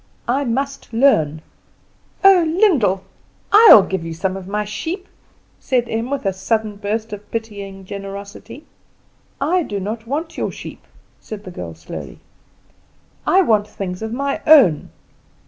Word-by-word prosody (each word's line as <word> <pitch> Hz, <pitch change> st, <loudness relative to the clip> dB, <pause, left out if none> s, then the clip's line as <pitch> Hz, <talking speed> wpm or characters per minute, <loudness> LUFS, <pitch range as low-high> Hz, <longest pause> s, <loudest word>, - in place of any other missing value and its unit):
I 270 Hz, +4 st, 0 dB
must 275 Hz, +3 st, -3 dB
learn." 160 Hz, -, +2 dB, 0.8 s
"Oh, 385 Hz, -3 st, +7 dB, 0.2 s
Lyndall! 230 Hz, -, +3 dB, 0.5 s
I 435 Hz, +3 st, +8 dB
will 205 Hz, -, +10 dB
give 190 Hz, -3 st, -3 dB
you 165 Hz, 0 st, -6 dB
some 185 Hz, +3 st, -2 dB
of 190 Hz, -1 st, -8 dB
my 210 Hz, +1 st, -2 dB
sheep," 340 Hz, -, -5 dB, 0.5 s
said 245 Hz, -3 st, 0 dB
Em, 225 Hz, +2 st, -3 dB
with 275 Hz, -4 st, -3 dB
a 195 Hz, -, +1 dB
sudden 210 Hz, +2 st, -2 dB
burst 215 Hz, +2 st, -3 dB
of 210 Hz, 0 st, -9 dB
pitying 200 Hz, -4 st, -6 dB
generosity. 200 Hz, +7 st, -9 dB, 0.7 s
"I 340 Hz, +6 st, +1 dB
do 205 Hz, -10 st, -4 dB
not 220 Hz, +4 st, -5 dB
want 315 Hz, +5 st, -4 dB
your -, -, -1 dB
sheep," -, -, -10 dB, 0.4 s
said 210 Hz, -2 st, -9 dB
the 185 Hz, -, -9 dB
girl 85 Hz, -, -7 dB
slowly; 80 Hz, -4 st, -9 dB, 1.1 s
"I 380 Hz, +1 st, +5 dB
want 215 Hz, -, +2 dB
things 190 Hz, -3 st, -6 dB
of 220 Hz, 0 st, -4 dB
my 275 Hz, +3 st, -2 dB
own. 255 Hz, -, +6 dB
215 Hz, 145 wpm, -19 LUFS, 195-275 Hz, 1.1 s, will